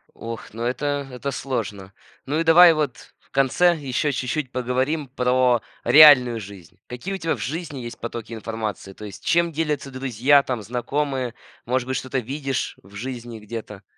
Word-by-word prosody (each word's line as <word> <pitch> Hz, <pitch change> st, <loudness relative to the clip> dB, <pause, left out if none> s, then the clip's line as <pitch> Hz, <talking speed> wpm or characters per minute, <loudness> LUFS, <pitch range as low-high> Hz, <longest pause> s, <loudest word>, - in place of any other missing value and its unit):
Ох, 115 Hz, -2 st, -8 dB
ну 115 Hz, +1 st, -5 dB
это 140 Hz, +3 st, -1 dB
это 125 Hz, +3 st, -4 dB
сложно. 105 Hz, -8 st, -4 dB, 0.3 s
Ну 145 Hz, +4 st, -1 dB
и -, -, +2 dB
давай 165 Hz, +1 st, +8 dB
вот 150 Hz, -5 st, -3 dB
в -, -, -33 dB
конце 135 Hz, +6 st, +3 dB
еще 145 Hz, 0 st, -1 dB
чуть-чуть 130 Hz, +1 st, -2 dB
поговорим 130 Hz, +4 st, -1 dB
про 125 Hz, -2 st, +2 dB, 0.2 s
реальную 130 Hz, -6 st, +8 dB
жизнь. 95 Hz, -4 st, -12 dB
Какие 125 Hz, +11 st, -5 dB
у -, -, -2 dB
тебя 165 Hz, -4 st, -1 dB
в -, -, -12 dB
жизни 150 Hz, -, -4 dB
есть 120 Hz, -1 st, -7 dB
потоки 115 Hz, -1 st, -6 dB
информации? 110 Hz, -3 st, -5 dB
То 105 Hz, -, -10 dB
есть 100 Hz, -2 st, -10 dB
чем 170 Hz, 0 st, +2 dB
делятся 150 Hz, -3 st, -2 dB
друзья 135 Hz, +1 st, +3 dB
там, 125 Hz, -4 st, -3 dB
знакомые? 130 Hz, +2 st, -2 dB, 0.3 s
Может 125 Hz, +1 st, -1 dB
быть 130 Hz, -, -1 dB
что-то 130 Hz, 0 st, -2 dB
видишь 135 Hz, +2 st, -3 dB
в 95 Hz, +2 st, -18 dB
жизни 120 Hz, 0 st, -6 dB
где-то? 105 Hz, -2 st, -8 dB
130 Hz, 165 wpm, -23 LUFS, 115-145 Hz, 0.3 s, давай